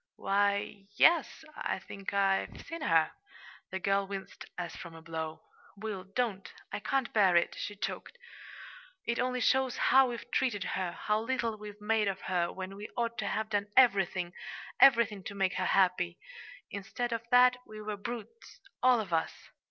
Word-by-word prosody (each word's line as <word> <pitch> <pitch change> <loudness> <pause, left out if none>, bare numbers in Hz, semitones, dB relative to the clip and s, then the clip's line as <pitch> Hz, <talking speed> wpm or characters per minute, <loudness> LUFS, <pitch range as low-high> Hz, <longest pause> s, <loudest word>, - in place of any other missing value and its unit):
"Why, 200 +1 +2
y 200 0 -6
yes; 330 -1 +4
I - - -2
think 195 +1 -7
I've 195 -1 +1
seen 330 -1 -6
her." 165 - +3 0.6
The 190 - -3
girl 195 0 +1
winced, 195 -1 -7
as 175 -2 -4
from 170 -1 -9
a 165 - -11
blow. 160 -1 -5 0.3
"Will, 205 -3 -5
don't! 195 -2 -2 0.2
I - - -3
can't 265 +4 -1
bear 195 -5 +5
it," 170 - +3
she 205 - -4
choked. 210 - -5 0.9
"It 235 0 -1
only 250 0 0
shows 265 -1 +2
how 265 0 +5
we've 240 0 -7
treated 230 -7 +1
her 180 -2 -2
how 210 0 0
little 230 -2 -1
we've 210 -1 -10
made 215 0 +1
of 195 -1 -2
her, 175 -2 0
when 190 +1 -7
we 205 +1 -8
ought 235 -1 -1
to - - -1
have 220 0 -2
done 205 -1 0
everything 190 -7 +4 0.5
everything 230 -7 +5
to 200 - -6
make 195 -1 +1
her 185 - 0
happy. 180 -2 +2 0.5
Instead 220 +4 -3
of 230 - -2
that, 250 0 +6
we 215 0 -9
were 210 0 -4
brutes 240 - -8 0.2
all 250 -1 +5
of 190 -5 -6
us!" 160 - -2
205 Hz, 175 wpm, -31 LUFS, 190-235 Hz, 0.9 s, that